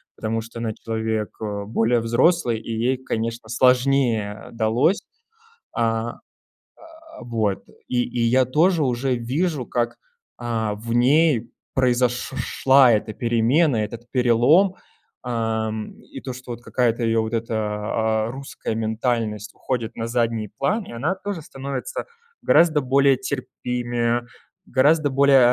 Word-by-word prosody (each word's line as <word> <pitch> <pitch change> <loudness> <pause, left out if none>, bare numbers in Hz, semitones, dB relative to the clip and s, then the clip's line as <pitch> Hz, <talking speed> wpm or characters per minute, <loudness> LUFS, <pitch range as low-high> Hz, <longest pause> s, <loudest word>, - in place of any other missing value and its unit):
потому 110 +1 -2
что 115 +1 -11
она 110 -2 -2
человек, 110 -1 -3
э, 100 -2 -3
более 115 +2 +1
взрослый 120 +1 +2
и 115 - -7
ей, 120 +4 0
конечно, 115 -3 -4
сложнее 125 -4 +2
далось. 120 - +2 0.7
А, 115 0 -1 0.7
а, 320 - -14
вот, 110 -4 -1 0.2
и 120 -1 +1
и 120 -1 -3
я 125 +2 +4
тоже 160 +5 +3
уже 125 0 0
вижу, 135 +4 -1
как, 120 0 -2 0.4
а, 115 -3 -2
в 115 +3 -7
ней 125 -1 +3 0.2
произош 125 -1 +1
шла 135 -2 +4
эта 110 0 -1
перемена, 120 +6 +2
этот 115 +3 -8
перелом, 130 - +4 0.5
ам, 110 -2 -2
и 135 - -10
то, 130 - -5
что 130 0 -9
вот 120 0 -7
какая-то 120 -1 0
её 115 0 +2
вот 110 +1 -4
эта, 115 0 -2
а, 110 +1 -1
русская 135 -4 -5
ментальность 110 -1 -2
уходит 120 -3 -3
на 115 0 -3
задний 115 -3 -1
план, 210 +9 0
и - - -11
она 145 +10 -1
тоже 195 -2 -5
становится 140 - -5 0.4
гораздо 160 -3 +4
более 135 +1 +4
терпимее, 120 -2 -2 0.4
гораздо 145 +3 +3
более, 140 0 +5
120 Hz, 130 wpm, -23 LUFS, 115-135 Hz, 0.7 s, более